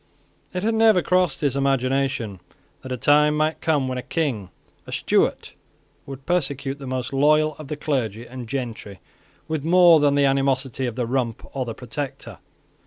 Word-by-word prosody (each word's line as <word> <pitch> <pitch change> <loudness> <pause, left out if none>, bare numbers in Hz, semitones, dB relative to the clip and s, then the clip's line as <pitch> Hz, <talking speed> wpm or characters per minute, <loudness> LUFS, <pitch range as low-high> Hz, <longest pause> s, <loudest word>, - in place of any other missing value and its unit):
It 180 +1 -4
had 225 +1 +1
never 220 -4 +4
crossed 180 -6 +1
his 140 -3 0
imagination 135 -5 0 0.4
that 130 - -9
a 125 - -2
time 150 +3 +4
might 155 +1 0
come 150 -5 +1
when 130 0 -3
a - - -3
King, 125 - -2 0.4
a - - -8
Stuart, - - 0 0.5
would 135 0 -9
persecute 140 -5 -1
the 135 - -8
most 130 +1 -3
loyal 155 +2 +3
of 155 - -8
the 150 0 -5
clergy 120 -7 -2
and 125 -2 -9
gentry 115 -7 -5 0.5
with 155 -3 -3
more 175 0 +6
than 145 -1 +3
the 140 0 +3
animosity 135 -2 0
of 120 - -5
the 125 -1 -1
Rump 120 -2 -2
or 130 -2 -1
the 115 -2 -6
Protector. 135 +3 -7
135 Hz, 175 wpm, -23 LUFS, 125-150 Hz, 0.5 s, more